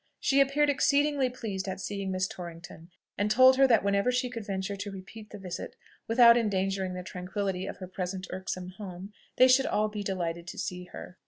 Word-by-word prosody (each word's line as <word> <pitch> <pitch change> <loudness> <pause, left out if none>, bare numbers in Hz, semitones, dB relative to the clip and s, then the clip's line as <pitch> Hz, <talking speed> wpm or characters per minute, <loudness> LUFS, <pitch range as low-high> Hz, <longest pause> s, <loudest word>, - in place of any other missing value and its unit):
She 275 0 +3
appeared 285 +2 +3
exceedingly 285 -1 +2
pleased 210 -6 -5
at 190 - -4
seeing 195 0 -4
Miss 185 0 0
Torrington, 170 -2 -10 0.3
and 205 +1 +1
told 255 +4 +6
her 270 0 +6
that 230 -5 +4
whenever 200 +4 +2
she 250 0 -1
could 230 -3 -6
venture 195 0 -3
to 200 +1 -5
repeat 200 +3 -10
the 210 - -9
visit 180 -3 -7 0.3
without 235 0 +7
endangering 195 -4 -1
the 180 - -5
tranquillity 185 +1 -4
of - - -6
her 185 - -8
present 185 +1 -4
irksome 185 -1 -5
home, 195 0 -8 0.2
they 255 - +7
should 260 +1 +4
all 215 0 +1
be 210 -1 -5
delighted 175 -3 -3
to - - -8
see 180 0 -4
her. 180 0 -11
200 Hz, 195 wpm, -29 LUFS, 185-235 Hz, 0.3 s, without